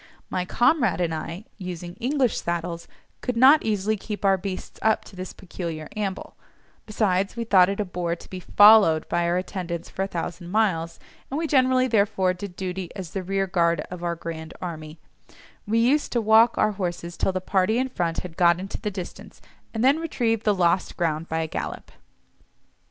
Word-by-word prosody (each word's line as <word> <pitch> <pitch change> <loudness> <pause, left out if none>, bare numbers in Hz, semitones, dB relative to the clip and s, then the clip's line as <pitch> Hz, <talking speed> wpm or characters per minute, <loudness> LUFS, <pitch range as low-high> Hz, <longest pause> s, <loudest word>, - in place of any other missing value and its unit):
My 180 -1 -1
comrade 240 - +2
and 170 -2 0
I, 170 +5 -6
using 175 -2 -6
English 255 -1 +1
saddles, 170 0 -3 0.3
could 250 -2 -2
not 270 +5 +7
easily 215 0 0
keep 210 0 -6
our 195 0 +5
beasts 190 0 -6
up 220 0 +2
to - - -14
this 185 0 -6
peculiar 165 -4 -7
amble; 200 -3 -4 0.5
besides, 200 -2 0
we 235 - -2
thought 190 -5 +5
it 200 - -3
a 210 - 0
bore 175 -2 -2
to - - -14
be 185 - -5
followed 205 -5 +6
by 170 0 +1
our 175 +1 +1
attendants 180 -2 -4
for - - -4
a 195 - 0
thousand 175 -1 -5
miles, 180 -6 0 0.3
and 275 - -3
we 325 - -1
generally, 260 -3 +3
therefore, 200 -5 +2
did 185 0 -8
duty 185 -1 -4
as 185 -5 -7
the 195 - -3
rearguard 180 -3 +1
of 180 -1 -7
our 170 -1 -1
"grand 160 -1 -7
army"; 160 -3 -7 0.7
we 220 +2 +1
used 260 +6 +2
to 240 - +2
walk 225 +1 +5
our 215 - +3
horses 175 -3 -4
till - - 0
the 185 - -2
party 190 +4 +1
in 260 +1 +1
front 175 -9 -2
had 175 -3 -9
got 170 -1 +4
into 195 +1 -6
the 210 - -1
distance, 185 -3 -8 0.3
and 225 0 -2
then 280 +4 +4
retrieve 235 -9 -1
the 210 -2 +3
lost 175 0 +1
ground 165 -1 -1
by 160 0 -1
a 160 - -2
gallop. - - -6
185 Hz, 190 wpm, -24 LUFS, 170-220 Hz, 0.7 s, not